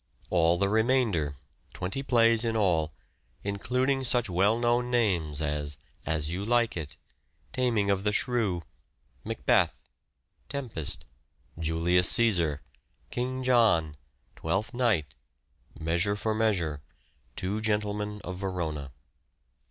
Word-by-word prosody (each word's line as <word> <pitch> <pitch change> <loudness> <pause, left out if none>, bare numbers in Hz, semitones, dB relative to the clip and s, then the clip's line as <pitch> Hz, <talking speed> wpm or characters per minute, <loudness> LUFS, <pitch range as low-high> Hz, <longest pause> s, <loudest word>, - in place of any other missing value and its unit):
All 85 -1 +3
the 100 +2 +1
remainder, 110 - +1 0.4
twenty 95 +9 -3
plays 115 -3 +4
in 115 -1 0
all, 85 -7 +1 0.5
including 125 +7 0
such 120 -4 +1
well 100 +6 +3
known 120 +1 +1
names 85 -11 +1
as, 75 -1 -2 0.3
As 75 -1 -1
You 90 +3 -3
Like 120 +1 +1
It. 75 -5 -6 0.6
Taming 115 -6 +1
of 95 -1 0
the 105 - +1
Shrew. 105 -7 0 0.6
Macbeth. - - +1 0.7
Tempest. 120 - -5 0.5
Julius 85 +3 +3
Caesar. 85 -11 +4 0.5
King 130 +1 -3
John. 110 -12 +3 0.4
Twelfth 95 +9 -2
Night. 110 - +1 0.7
Measure 85 +6 +2
for 110 +1 -1
Measure. 90 -10 0 0.5
Two 100 +4 -2
Gentlemen 105 -1 -1
of 95 -3 -6
Verona. 85 -7 -3
100 Hz, 110 wpm, -28 LUFS, 80-115 Hz, 0.7 s, plays